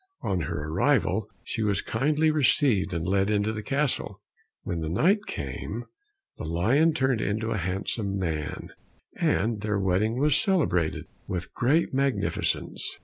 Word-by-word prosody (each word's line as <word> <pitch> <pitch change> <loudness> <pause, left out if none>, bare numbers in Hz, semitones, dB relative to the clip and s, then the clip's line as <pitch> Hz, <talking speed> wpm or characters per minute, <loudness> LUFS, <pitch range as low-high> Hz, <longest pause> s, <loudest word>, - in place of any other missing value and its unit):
On 95 - 0
her 75 -2 -3
arrival 80 - +1
she - - -3
was 105 -3 +1
kindly 150 +6 +2
received 135 -9 +3
and 85 -1 -2
led 95 +1 +2
into 105 +1 +1
the 105 - -4
castle. 135 -5 -1 0.4
When 90 -7 -3
night 200 - +2
came, 75 - -5 0.6
the - - -5
lion 120 - +2
turned 130 -6 +1
into 110 +3 -1
a - - 0
handsome 95 +3 -2
man, 80 -5 -3 0.5
and 110 +1 +1
their 105 -1 0
wedding 100 +5 +1
was 145 +1 +3
celebrated 135 - +1 0.2
with 90 -1 -4
great 145 +7 +2
magnificence. 130 -7 -1
105 Hz, 140 wpm, -27 LUFS, 95-135 Hz, 0.6 s, received